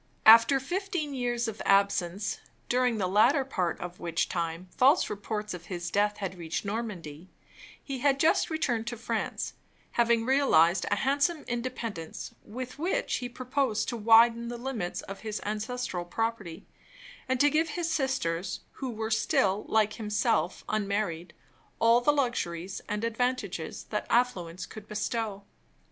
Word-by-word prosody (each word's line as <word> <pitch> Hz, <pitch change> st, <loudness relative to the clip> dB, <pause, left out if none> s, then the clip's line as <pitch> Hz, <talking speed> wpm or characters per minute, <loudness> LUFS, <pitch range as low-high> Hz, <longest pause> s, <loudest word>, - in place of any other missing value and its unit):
After 230 Hz, +5 st, +8 dB
fifteen 350 Hz, 0 st, -3 dB
years 240 Hz, -2 st, -1 dB
of 220 Hz, -1 st, -5 dB
absence 195 Hz, -1 st, +1 dB, 0.3 s
(during 250 Hz, -2 st, +2 dB
the 195 Hz, -, 0 dB
latter 235 Hz, +9 st, +4 dB
part 185 Hz, -10 st, -1 dB
of 180 Hz, 0 st, -7 dB
which 170 Hz, -1 st, -1 dB
time 170 Hz, +1 st, -3 dB
false 275 Hz, +7 st, +4 dB
reports 210 Hz, 0 st, -4 dB
of 175 Hz, -1 st, -8 dB
his 175 Hz, -2 st, -5 dB
death 205 Hz, +1 st, +2 dB
had 190 Hz, -3 st, -5 dB
reached 165 Hz, +4 st, -3 dB
Normandy), 190 Hz, -7 st, -5 dB, 0.5 s
he 270 Hz, -2 st, -5 dB
had 275 Hz, +1 st, +2 dB
just 320 Hz, -, +3 dB
returned 240 Hz, -8 st, -1 dB
to 240 Hz, 0 st, -3 dB
France, 230 Hz, -, -3 dB, 0.4 s
having 235 Hz, -1 st, +2 dB
realized 215 Hz, -, +4 dB
a -, -, +2 dB
handsome 285 Hz, +4 st, +1 dB
independence, 235 Hz, -8 st, -5 dB
with 250 Hz, +5 st, -7 dB
which 385 Hz, +10 st, 0 dB
he 245 Hz, -1 st, -5 dB
proposed 255 Hz, -2 st, -1 dB
to 240 Hz, -, -3 dB
widen 230 Hz, +1 st, +5 dB
the 240 Hz, 0 st, -5 dB
limits 235 Hz, -8 st, -4 dB
of 195 Hz, -, -8 dB
his 215 Hz, -1 st, -4 dB
ancestral 215 Hz, -3 st, -3 dB
property, 200 Hz, -2 st, -3 dB, 0.6 s
and 260 Hz, -1 st, +1 dB
to 290 Hz, +2 st, +5 dB
give 320 Hz, +2 st, +2 dB
his 345 Hz, -2 st, -2 dB
sisters 195 Hz, -, -1 dB
(who 265 Hz, -, -5 dB
were 220 Hz, -1 st, -4 dB
still, 210 Hz, -2 st, +2 dB
like 215 Hz, -1 st, +3 dB
himself, 210 Hz, -5 st, 0 dB
unmarried) 200 Hz, -5 st, -1 dB, 0.5 s
all 230 Hz, +1 st, +5 dB
the 295 Hz, -, +4 dB
luxuries 195 Hz, -, -2 dB
and 210 Hz, +1 st, -2 dB
advantages 230 Hz, -7 st, -2 dB
that 210 Hz, -, -2 dB
affluence 185 Hz, -8 st, 0 dB
could 215 Hz, -1 st, -11 dB
bestow. 215 Hz, -1 st, -3 dB
225 Hz, 145 wpm, -29 LUFS, 195-250 Hz, 0.6 s, After